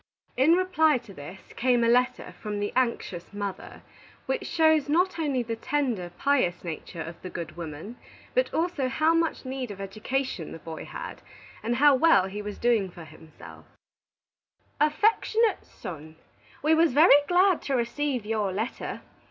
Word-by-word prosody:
In 275 +6 +5
reply 340 -5 +3
to 230 -5 -12
this, 165 +5 -11
came 245 -1 +2
a - - +3
letter 250 +2 +1
from 210 -1 -3
the 205 0 -2
anxious 235 -8 -1
mother, 200 -2 -6 0.4
which 470 -6 -2
shows 315 -3 +3
not 355 +3 +2
only 280 -6 0
the 230 -1 -3
tender, 235 -7 -1
pious 255 -12 +1
nature 165 0 -6
of 165 +1 -10
the 185 - -7
good 170 -2 -6
woman, 170 +7 -7 0.4
but - - +1
also 320 -6 0
how 310 +5 +2
much 330 -3 0
need 260 -2 -4
of 200 -1 -8
education 215 - -3
the - - -7
boy 160 0 -8
had, - - -8 0.4
and 235 +2 -1
how 290 +3 +6
well 265 - +5
he 200 +2 -5
was 205 0 -6
doing 230 -5 +2
for 175 -1 -11
himself: 160 0 -14 1.1
"AFFECTIONATE 435 +8 +2
SON: 155 -1 -9 0.5
We 310 +2 +4
was 320 -3 +4
very 290 0 +7
glad 365 0 +4
to 275 - -3
receave 250 0 -1
your 210 -3 -1
letter. 220 +7 -4
245 Hz, 160 wpm, -27 LUFS, 195-305 Hz, 1.1 s, very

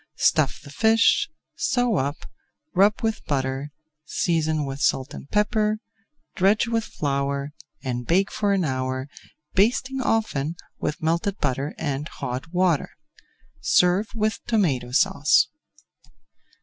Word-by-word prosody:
Stuff - - +2
the 140 - -11
fish, 225 - +3 0.2
sew 245 -7 +1
up, 140 +3 -2 0.5
rub 205 +6 +3
with 220 -1 -1
butter, 135 0 -2 0.3
season 155 -1 0
with 135 0 -5
salt 135 0 +1
and 140 - -9
pepper, 210 0 +1 0.6
dredge 200 +5 +3
with 230 -1 0
flour, 140 0 -2 0.3
and 125 -2 -3
bake 190 +4 +2
for 205 -1 0
an 190 -3 +2
hour, 130 -1 -2 0.5
basting 255 +6 +2
often 170 - 0 0.2
with 150 - -3
melted 170 +5 0
butter 140 +1 -2
and 145 -1 -2
hot 135 +3 -5
water. 180 -4 +2 0.7
Serve 180 +4 +3
with 215 0 0
Tomato 150 - +1
Sauce. 140 +4 +4
165 Hz, 120 wpm, -24 LUFS, 140-210 Hz, 0.7 s, Sauce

